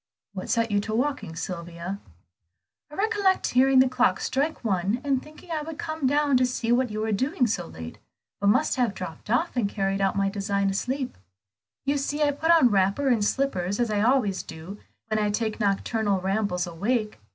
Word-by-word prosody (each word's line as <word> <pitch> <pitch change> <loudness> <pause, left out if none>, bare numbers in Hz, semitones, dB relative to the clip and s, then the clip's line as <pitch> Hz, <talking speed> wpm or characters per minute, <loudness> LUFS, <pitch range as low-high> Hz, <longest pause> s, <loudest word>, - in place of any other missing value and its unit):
"What 185 -1 -6
set 230 -1 +1
you 205 0 +2
walking, 235 - -1
Sylvia?" 170 +2 -5 0.9
"I 300 - -11
recollect 405 -2 +1
hearing 265 +1 +4
the 260 0 +7
clock 250 -7 +2
strike 285 +3 -1
one, 195 +2 0
and 275 -2 +1
thinking 310 +3 -14
I 315 -2 -1
would 310 0 -7
come 315 -4 -2
down 285 -1 +3
to 255 - +3
see 235 -2 -2
what 250 +1 +3
you 215 0 -3
were 220 0 -1
doing 260 - +1
so 225 - -2
late, 80 0 -9 0.4
but 200 - 0
must 255 +9 +3
have 240 -6 +1
dropped 165 0 -8
off 260 +9 +1
and 225 -5 +1
carried 195 -1 -1
out 195 0 +1
my 195 0 +1
design 200 0 0
asleep. 255 - -3 0.7
You 285 +1 +1
see 290 +2 -1
I 290 - +3
put 315 +3 -2
on 320 -8 +6
wrapper 200 +8 +2
and 230 -5 +2
slippers 205 -6 0
as 240 -2 +1
I 205 -1 +1
always 220 -5 +2
do, 165 +6 -9 0.3
when 215 -1 -1
I 210 -1 +1
take 220 +1 -2
nocturnal 205 0 0
rambles 190 -1 0
awake. 210 - -2
220 Hz, 190 wpm, -26 LUFS, 195-270 Hz, 0.9 s, the